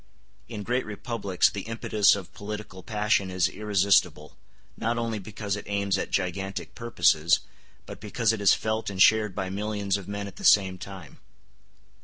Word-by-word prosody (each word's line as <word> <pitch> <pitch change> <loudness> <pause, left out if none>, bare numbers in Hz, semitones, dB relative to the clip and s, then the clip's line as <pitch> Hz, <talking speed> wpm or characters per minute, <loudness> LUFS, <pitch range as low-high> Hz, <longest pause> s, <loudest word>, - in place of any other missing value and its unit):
In 105 -3 -6
great 125 +4 0
republics 105 -3 0
the 100 - -4
impetus 110 -2 +2
of 95 -3 -9
political 105 -2 -7
passion 105 -2 0
is 90 -1 +1
irresistible, 100 -6 +1 0.4
not 115 +2 -1
only 115 -2 -2
because 105 0 -4
it 105 - -7
aims 100 -1 0
at - - -3
gigantic 95 +1 -3
purposes, 85 -8 +2 0.4
but - - -10
because 110 +1 0
it 110 - -4
is 100 - +6
felt 110 0 -2
and 95 -2 -7
shared 105 -1 +5
by 95 -2 -3
millions 100 -1 -1
of 100 - -10
men 100 0 -4
at 100 - -10
the - - -10
same 95 -2 +4
time. 95 -7 -10
100 Hz, 165 wpm, -26 LUFS, 95-110 Hz, 0.4 s, is